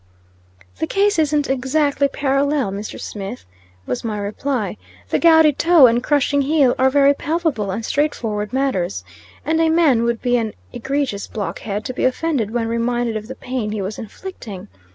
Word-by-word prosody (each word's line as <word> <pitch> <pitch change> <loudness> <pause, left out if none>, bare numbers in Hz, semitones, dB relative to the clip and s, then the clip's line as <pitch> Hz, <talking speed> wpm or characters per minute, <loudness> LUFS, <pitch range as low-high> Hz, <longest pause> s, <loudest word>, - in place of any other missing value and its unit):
"The 160 - -1
case 405 -2 +2
isn't 300 -2 +1
exactly 280 +2 +1
parallel, 275 -3 0
Mr. 205 +2 -6
Smith," 195 - -7 0.4
was 125 - -3
my 220 -2 -3
reply. 210 - -3 0.3
"The - - +1
gouty 320 -2 +6
toe 330 0 +6
and 240 0 +3
crushing 285 0 +2
heel 280 -3 +3
are 260 +1 +5
very 280 +1 +4
palpable 300 - -1
and 220 +4 -3
straightforward 225 -9 -1
matters, 190 - -1 0.4
and 320 +1 +1
a 325 - +3
man 320 -8 +4
would 235 -1 0
be 245 -1 +1
an 225 -3 -3 0.2
egregious 260 -3 -2
blockhead 205 0 -4
to 255 - -4
be - - -3
offended 260 -3 0
when 230 0 -1
reminded 235 0 -1
of 215 0 -5
the 260 - -7
pain 250 -6 -4
he 210 - -3
was 200 +3 -5
inflicting. 215 - -9
255 Hz, 165 wpm, -20 LUFS, 215-290 Hz, 0.4 s, gouty